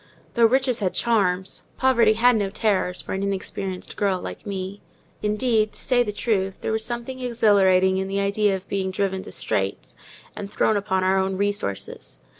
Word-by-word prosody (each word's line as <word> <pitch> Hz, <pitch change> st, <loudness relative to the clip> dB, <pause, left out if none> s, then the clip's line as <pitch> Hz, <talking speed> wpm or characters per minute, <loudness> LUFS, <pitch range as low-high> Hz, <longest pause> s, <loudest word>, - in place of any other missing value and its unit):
Though 235 Hz, -1 st, +5 dB
riches 260 Hz, 0 st, +1 dB
had 190 Hz, -4 st, -1 dB
charms, 190 Hz, -5 st, 0 dB
poverty 235 Hz, -4 st, +4 dB
had 240 Hz, +2 st, +4 dB
no 205 Hz, -3 st, 0 dB
terrors 195 Hz, -3 st, 0 dB
for -, -, -5 dB
an 190 Hz, -, -2 dB
inexperienced 195 Hz, -1 st, -4 dB
girl 195 Hz, -3 st, +1 dB
like 210 Hz, -, -8 dB
me. 195 Hz, 0 st, -5 dB, 0.4 s
Indeed, 215 Hz, 0 st, +1 dB
to -, -, -7 dB
say 250 Hz, -2 st, +3 dB
the 220 Hz, -4 st, 0 dB
truth, 200 Hz, -3 st, -1 dB
there -, -, -2 dB
was 220 Hz, 0 st, 0 dB
something 240 Hz, +2 st, -5 dB
exhilarating 195 Hz, -6 st, +3 dB
in 190 Hz, -, -2 dB
the 195 Hz, +1 st, -1 dB
idea 200 Hz, 0 st, +2 dB
of 190 Hz, 0 st, -8 dB
being 190 Hz, -1 st, -1 dB
driven 190 Hz, 0 st, -1 dB
to -, -, -10 dB
straits, -, -, -3 dB, 0.4 s
and 200 Hz, 0 st, -7 dB
thrown 220 Hz, -, +2 dB
upon 190 Hz, -2 st, 0 dB
our 190 Hz, +1 st, +3 dB
own 190 Hz, 0 st, -1 dB
resources. 200 Hz, -, -3 dB
200 Hz, 180 wpm, -24 LUFS, 190-225 Hz, 0.4 s, Though